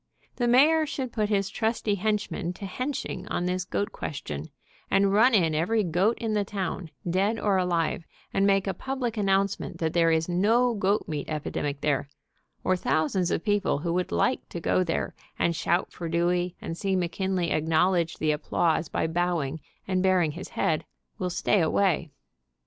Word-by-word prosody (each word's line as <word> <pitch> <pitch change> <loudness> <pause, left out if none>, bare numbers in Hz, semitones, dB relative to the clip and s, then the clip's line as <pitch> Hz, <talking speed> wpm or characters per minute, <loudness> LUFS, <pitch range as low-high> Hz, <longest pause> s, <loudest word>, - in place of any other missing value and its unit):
The 245 - +1
mayor 305 +6 +5
should 260 -4 -4
put 215 -2 0
his 200 -2 +1
trusty 220 -2 0
henchmen 200 -3 -1
to 200 - -8
henching 255 +8 -4
on 175 - -1
this 180 +1 -1
8i - - -46
goat 205 - -1
question, 75 - -5 0.4
and 195 0 +3
run 230 +4 +5
in 165 -6 +3
every 205 +8 +1
goat 185 +6 +1
in 225 -2 -2
the 210 -1 +2
town, 190 -3 -4 0.2
dead 195 +6 +1
or 200 -2 +2
alive, 170 -2 0 0.3
and 195 +1 +3
make 195 -1 +3
a 195 - -1
publit 260 -3 -3
announcement 195 -3 0
that 160 -1 -1
there 165 -1 +4
is 160 0 +2
no 225 +8 +3
goat 200 0 0
meat 150 -3 -4
epidemic 150 -2 -3
there, 140 -1 0 0.5
or 185 - +2
thousands 175 +1 0
of - - -1
people 205 -6 +1
who 170 +3 -2
would 180 0 -1
like - - 0
to 170 - -5
go 185 +2 +2
there, 165 -2 -2 0.2
and 170 - +1
shout 170 +2 0
for 170 -2 -6
Dewey, 175 +1 +1
and 165 - -5
see 195 +2 -1
McKinley 185 0 -1
acknowledge 165 +2 +2
the' 155 0 +1
applause 160 +1 0
by - - -1
bowing, 160 -3 -1 0.3
and 185 -1 +1
baring 185 -4 +3
his 170 +5 -8
head, 155 -1 0 0.4
will 180 - -1
stay 185 +2 +2
away. 170 0 +1
185 Hz, 175 wpm, -27 LUFS, 165-205 Hz, 0.5 s, mayor